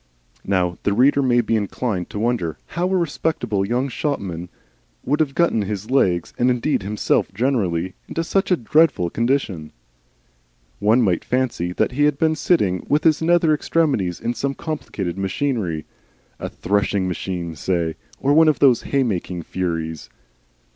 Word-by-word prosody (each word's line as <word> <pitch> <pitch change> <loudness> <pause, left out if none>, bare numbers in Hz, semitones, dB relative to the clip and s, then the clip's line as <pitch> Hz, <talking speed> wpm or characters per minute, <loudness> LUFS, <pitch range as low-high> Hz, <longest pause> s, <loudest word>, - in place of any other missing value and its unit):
Now 90 -3 0
the 100 - +1
reader 135 +6 +4
may 120 -2 +3
be 115 0 0
inclined 105 -2 -2
to - - -7
wonder 110 -8 -1 0.2
how 175 +3 0
a 190 - +2
respectable 145 - -1
young 120 +6 0
shopman 95 - -3 0.6
should 145 +4 +1
have 145 -3 0
got 170 0 +3
his 105 0 -2
legs, 90 -10 +2
and 125 - +4
indeed 125 +2 +1
himself 105 +2 0
generally, 95 -8 0
into 165 - -2
such 195 +4 0
a 180 - +3
dreadful 130 - +2
condition. 115 - -1 1.1
One 110 +4 +4
might 90 -5 +1
fancy 125 -9 -1
that - - 0
he 145 +3 +2
had 150 -2 +2
been 160 +1 +2
sitting 105 - +1
with 150 +1 +2
his 160 -1 +3
nether 165 -1 +3
extremities 145 - 0
in 120 - -2
some 135 +4 -2
complicated 100 - -4
machinery, 95 - -1 0.5
a - - -4
threshing 100 -1 0
machine, 90 -2 -4
say, 85 0 -1 0.3
or 140 +1 +2
one 160 +1 +6
of 155 -4 +3
those 125 -3 +4
hay 140 -1 +1
making 90 -6 -3
furies. 80 -3 -3
115 Hz, 155 wpm, -21 LUFS, 95-145 Hz, 1.1 s, one